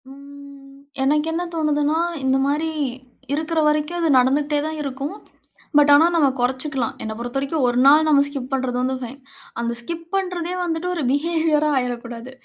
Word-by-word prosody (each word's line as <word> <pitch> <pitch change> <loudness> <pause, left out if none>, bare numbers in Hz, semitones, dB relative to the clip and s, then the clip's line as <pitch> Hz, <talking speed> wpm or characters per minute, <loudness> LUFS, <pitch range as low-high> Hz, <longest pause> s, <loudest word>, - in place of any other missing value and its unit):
ம், 280 0 -14 0.3
எனக்கு 300 +3 +2
என்ன 345 +2 -1
தோணுதுன்னா, 300 -1 +1 0.3
இந்தமாரி 275 +4 +1 0.6
இருக்கிற 315 +2 -1
வரைக்கும் 300 +3 0
அது 330 -2 +1
நடந்துகிட்டே 290 +3 +1
தான் 315 0 -4
இருக்கும். 275 +3 -4 0.6
பட் 290 0 +6
ஆனா, 305 +3 +6
நாம 295 -5 +4
குறைச்சுக்கலாம். 260 0 -1
என்ன 220 - -4
பொறுத்தவரைக்கும் 270 +4 -2
ஒரு 245 0 0
நாள் 305 +2 +6
நம்ம 285 -2 +5
ஸ்கிப் 275 -2 -6
பண்றது 260 -2 -1
வந்து 260 +1 -1
பைன். 255 +3 -8 0.4
அந்த 235 0 -2
ஸ்கிப் 335 +6 -6
பண்றதே 360 -2 -2
வந்துட்டு 335 0 -2
ஒரு 325 - -2
பிஹேவியரா 310 0 +1
ஆயிறடக்கூடாது. 240 -1 -4
285 Hz, 150 wpm, -21 LUFS, 265-315 Hz, 0.6 s, பட்